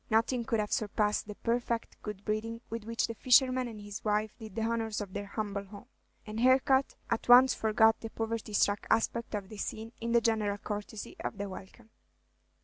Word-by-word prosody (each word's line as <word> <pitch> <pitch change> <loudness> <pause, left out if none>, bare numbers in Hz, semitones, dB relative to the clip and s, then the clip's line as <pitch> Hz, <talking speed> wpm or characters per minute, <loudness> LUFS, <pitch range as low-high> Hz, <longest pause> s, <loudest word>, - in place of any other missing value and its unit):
Nothing 230 +2 +2
could 230 -3 0
have 210 -1 -2
surpassed 210 0 0
the 210 - -7
perfect 235 0 -2
good 210 -2 -7
breeding 225 +2 -2
with 230 -2 -4
which 230 0 0
the 230 - -4
fisherman 255 +2 +4
and 220 -3 -8
his 205 -1 -8
wife 215 0 0
did 215 -3 -9
the 225 - -1
honors 225 -1 -1
of 200 -3 -6
their 200 - -4
humble 200 -1 -3
home; 200 +3 -12 0.4
and 215 +1 -5
Harcourt 265 +2 +4 0.2
at 230 +1 -1
once 250 +2 +9
forgot 220 0 +3
the 225 - -6
poverty 225 -1 -4
struck 205 0 +2
aspect 225 0 +1
of 200 -2 -5
the 215 - -9
scene 220 +2 -5
in 230 0 -2
the 235 - +6
general 215 -3 +1
courtesy 205 +1 -6
of - - -4
the 200 0 -3
welcome. 195 +4 -11
220 Hz, 195 wpm, -31 LUFS, 210-230 Hz, 0.4 s, once